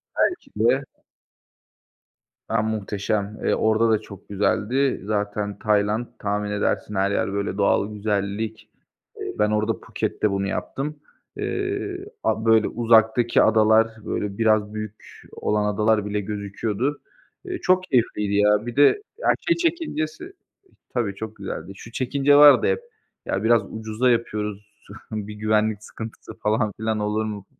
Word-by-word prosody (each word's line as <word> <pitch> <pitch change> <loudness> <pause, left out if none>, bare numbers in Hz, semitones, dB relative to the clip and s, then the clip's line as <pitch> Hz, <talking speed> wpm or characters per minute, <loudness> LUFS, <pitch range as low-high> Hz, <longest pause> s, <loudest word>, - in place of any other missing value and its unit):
Belki 360 - 0
de. 120 +6 +2 1.7
Ya, 115 -1 +2
muhteşem, 105 -1 -2
eee, - - +2
orada 110 +1 +2
da 110 - +3
çok 100 -2 -13
güzeldi. 120 +6 +1
Zaten 105 -1 -2
Tayland 105 +2 +1
tahmin 105 0 -2
edersin 105 0 -1
her 95 +1 +1
yer 100 - 0
böyle 100 -1 -2
doğal 100 +1 +2
güzellik. 105 +1 -3 0.5
Eee, - - -4
ben 105 0 +3
orada 110 +1 0
Puket'te 105 - -2
bunu 100 0 -1
yaptım. 145 +8 -4 0.4
Eee, 390 -1 -3 0.2
a 110 - 0
böyle 110 -1 +5
uzaktaki 115 0 +3
adalar, 110 0 +5 0.2
böyle, 100 -1 -3
biraz 110 -2 +2
büyük 110 0 -8
olan 105 0 0
adalar 105 0 +2
bile 105 0 -1
gözüküyordu. 105 +6 -3 0.4
Eee, 365 -1 -4
çok 185 0 +3
keyifliydi 115 - 0
ya. 105 +1 +3
Bir 120 - -5
de, 145 - +5 0.2
ya, 485 - 0 0.2
şey 335 - +4
çekincesi 335 - -2 0.6
tabii 115 -6 0
çok 110 +2 -7
güzeldi. 100 0 -6
Şu 115 - -12
çekince 140 +3 +2
vardı 145 - +8
hep: 470 0 +1 0.5
Ya, 95 +2 -1
biraz 115 -1 +5
ucuza 110 +3 0
yapıyoruz, 105 -3 -2 0.4
bir 105 -1 -5
güvenlik 110 0 +1
sıkıntısı 110 +1 -9
falan 105 -1 0
filan 110 0 0
olur 105 +1 0
mu? 105 -2 -6
110 Hz, 135 wpm, -23 LUFS, 105-120 Hz, 1.7 s, vardı